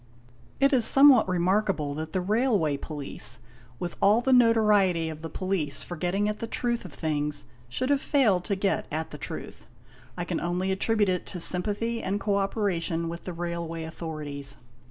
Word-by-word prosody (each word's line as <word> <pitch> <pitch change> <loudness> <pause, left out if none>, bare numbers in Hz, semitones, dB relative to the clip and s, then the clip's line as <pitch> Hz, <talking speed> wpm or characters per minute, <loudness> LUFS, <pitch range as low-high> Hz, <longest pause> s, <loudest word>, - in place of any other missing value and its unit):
It 275 +1 +4
is 250 -3 +4
somewhat 270 -4 +6
remarkable 180 -4 +1
that 155 +2 -5
the 185 - -1
Railway 205 - +1
Police, 140 -6 -4 0.4
with 175 +5 -5
all 210 +3 +5
the 265 +1 +2
notoriety 210 -8 +4
of 155 -1 -8
the 165 - -6
Police 165 -5 -2
for 175 - -6
getting 185 +5 0
at 210 0 -3
the 230 - -4
truth 235 -1 -2
of 180 - -8
things, 150 -1 -2 0.2
should 255 - -1
have 280 -1 +2
failed 225 - +2
to 200 - 0
get 195 0 -1
at 155 +1 -3
the - - -8
truth. - - -8 0.5
I - - -2
can - - -2
only 180 +2 -1
attribute 205 +2 +1
it 180 -1 -1
to 180 - -3
sympathy 210 +7 +1
and 200 +2 -2
co 200 -1 0
operation 185 -5 -1
with 170 +1 -7
the 180 - -4
Railway 170 -1 -4
authorities. 150 -4 -6
185 Hz, 175 wpm, -27 LUFS, 160-215 Hz, 0.5 s, somewhat